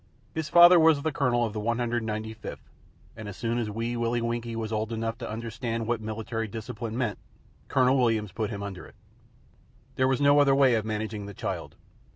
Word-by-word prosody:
His 160 Hz, -2 st, -3 dB
father 175 Hz, +1 st, +8 dB
was 160 Hz, -3 st, +4 dB
the 160 Hz, -, 0 dB
Colonel 125 Hz, -6 st, +1 dB
of 110 Hz, -, -4 dB
the 110 Hz, -, -3 dB
195th, 110 Hz, -2 st, -2 dB, 0.6 s
and 110 Hz, -1 st, -8 dB
as 100 Hz, -, -9 dB
soon 115 Hz, +1 st, -1 dB
as 110 Hz, -3 st, -2 dB
Wee 115 Hz, +3 st, -3 dB
Willie 120 Hz, 0 st, 0 dB
Winkie 115 Hz, 0 st, -3 dB
was 110 Hz, -1 st, -4 dB
old 110 Hz, +1 st, -2 dB
enough 115 Hz, 0 st, -3 dB
to 115 Hz, -, -5 dB
understand 115 Hz, +1 st, -4 dB
what 115 Hz, -1 st, -1 dB
Military 110 Hz, +1 st, -4 dB
Discipline 110 Hz, +1 st, -6 dB
meant, 120 Hz, -5 st, -1 dB, 0.5 s
Colonel 130 Hz, 0 st, +3 dB
Williams 110 Hz, -5 st, +1 dB
put 105 Hz, +2 st, -2 dB
him 100 Hz, -2 st, -5 dB
under 95 Hz, -3 st, -7 dB
it. -, -, -19 dB, 1.0 s
There 130 Hz, -, +3 dB
was 130 Hz, -1 st, +1 dB
no 145 Hz, 0 st, +5 dB
other 140 Hz, -1 st, +5 dB
way 135 Hz, -2 st, +5 dB
of 110 Hz, -2 st, 0 dB
managing 110 Hz, -1 st, -4 dB
the 100 Hz, -, -9 dB
child. -, -, -5 dB
115 Hz, 190 wpm, -27 LUFS, 110-125 Hz, 1.0 s, father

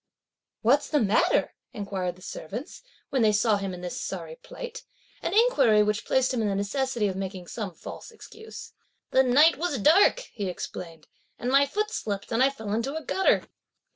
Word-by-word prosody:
"What's 275 Hz, +6 st, +3 dB
the 300 Hz, -, +2 dB
matter?" 215 Hz, -3 st, +2 dB, 0.2 s
inquired 190 Hz, -4 st, -3 dB
the 185 Hz, -, -17 dB
servants, 205 Hz, -, -7 dB, 0.3 s
when 265 Hz, -, +1 dB
they 215 Hz, -1 st, +5 dB
saw 210 Hz, 0 st, +3 dB
him 195 Hz, -1 st, -4 dB
in 180 Hz, -1 st, -8 dB
this 180 Hz, -1 st, -5 dB
sorry 165 Hz, -4 st, -5 dB
plight; -, -, -8 dB, 0.4 s
(an -, -, -2 dB
inquiry) 275 Hz, -, +5 dB
which 210 Hz, +1 st, -1 dB
placed 260 Hz, 0 st, +2 dB
him 240 Hz, -, 0 dB
in 215 Hz, -, +1 dB
the 200 Hz, -, 0 dB
necessity 235 Hz, +3 st, -1 dB
of 190 Hz, -, -3 dB
making 190 Hz, -1 st, -5 dB
some 195 Hz, -1 st, -6 dB
false -, -, -9 dB
excuse. 445 Hz, 0 st, -11 dB, 0.4 s
"The 260 Hz, -, +5 dB
night 280 Hz, +5 st, +5 dB
was 335 Hz, -5 st, -1 dB
dark," 335 Hz, -, +5 dB
he 205 Hz, -4 st, -3 dB
explained, 165 Hz, -3 st, -7 dB, 0.3 s
"and 245 Hz, +2 st, -2 dB
my 280 Hz, +1 st, +5 dB
foot 425 Hz, +8 st, -2 dB
slipped 200 Hz, -, -4 dB
and 230 Hz, +2 st, +1 dB
I 265 Hz, -, +6 dB
fell 220 Hz, -7 st, -6 dB
into 240 Hz, +7 st, -1 dB
a 320 Hz, -, -4 dB
gutter." 385 Hz, -, +2 dB
225 Hz, 185 wpm, -26 LUFS, 195-280 Hz, 0.4 s, I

